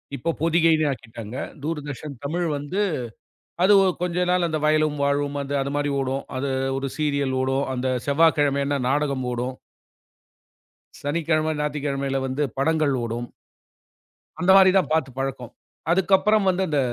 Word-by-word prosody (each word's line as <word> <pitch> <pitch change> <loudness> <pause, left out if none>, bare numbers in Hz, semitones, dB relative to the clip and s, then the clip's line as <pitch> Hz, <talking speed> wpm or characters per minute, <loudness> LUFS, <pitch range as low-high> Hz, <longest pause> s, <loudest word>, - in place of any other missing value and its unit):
இப்போ 155 +7 -3
பொதிகைன்னு 165 -1 +3
ஆக்கிட்டாங்க. 115 -3 -8 0.3
தூர்தர்ஷன் 150 -2 -5
தமிழ் 170 +4 -1
வந்து 145 +9 -3 0.8
அது 205 +2 +6
ஒ - - +3 0.2
கொஞ்சம் 180 0 0
நாள் 180 -1 +2
அந்த 160 -1 -1
வயலும் 155 -1 +2
வாழுமும் 145 0 0
அது 140 0 -5
அந்த 140 +1 -3
மாரி 145 0 0
ஓடும். 135 +1 -2
அது 135 +1 -2 0.3
ஒரு 135 0 -2
சீரியல் 140 -3 0
ஓடும். 135 +1 0
அந்த 130 +1 -2 0.2
செவ்வாய்கிழமையினா 145 -2 +2
நாடகம் 140 -2 0
ஓடும். 125 +2 -3 1.5
சனிக்கிழம, 155 +1 0
ஞாயித்துக்கிழமையில 140 -2 -2
வந்து 135 +3 -1
படங்கள் 155 -1 +2
ஓடும். 120 +1 -4 1.1
அந்த 180 +2 +4
மாரி 190 -1 +7
தான் 185 - +1
பாத்துப் 135 -5 -1
பழக்கம். 130 -3 -4 0.4
அதுக்கப்புறம் 195 +3 +3
வந்து 185 +1 +1
இந்த 150 -2 +1
145 Hz, 135 wpm, -23 LUFS, 135-160 Hz, 1.5 s, மாரி